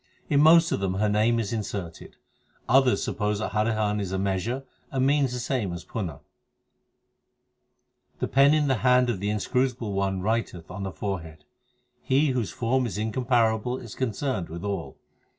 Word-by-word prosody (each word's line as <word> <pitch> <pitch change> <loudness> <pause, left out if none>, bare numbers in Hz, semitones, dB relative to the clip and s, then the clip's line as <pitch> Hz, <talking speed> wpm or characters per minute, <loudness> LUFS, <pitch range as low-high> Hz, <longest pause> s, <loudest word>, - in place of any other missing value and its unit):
In 145 -1 +5
most 165 +2 +6
of - - 0
them 95 -1 -1
her 105 +2 +1
name 110 +3 +2
is 110 -1 -2
inserted. 100 -6 -5 0.5
Others 130 0 +4
suppose 105 -1 -1
that 110 - -3
Harihan 105 -1 0
is 100 -2 -3
a 95 - -1
measure 100 +7 -1 0.3
and 130 -1 0
means 140 -2 +2
the 125 - -3
same 120 -5 -2
as 85 - -7
Punha: 90 - -4
i - - -18 2.0
The - - -2
pen 140 +3 +5
in 150 -2 +2
the 130 -3 +2
hand 125 0 +3
of 100 - -4
the 100 +2 -2
Inscrutable 120 +1 -1
One 95 -1 0
writeth 110 -6 -2
on 95 +2 -6
the 95 -1 -3
forehead. 80 -7 -5 0.6
He 140 +3 +2
whose 125 -5 -1
form 125 +2 0
is 100 -4 -5
incomparable 115 +1 +1
is 115 -5 -9
concerned 130 -5 -2
with 85 +3 -7
all. 100 -5 -4
110 Hz, 170 wpm, -26 LUFS, 100-125 Hz, 2.0 s, most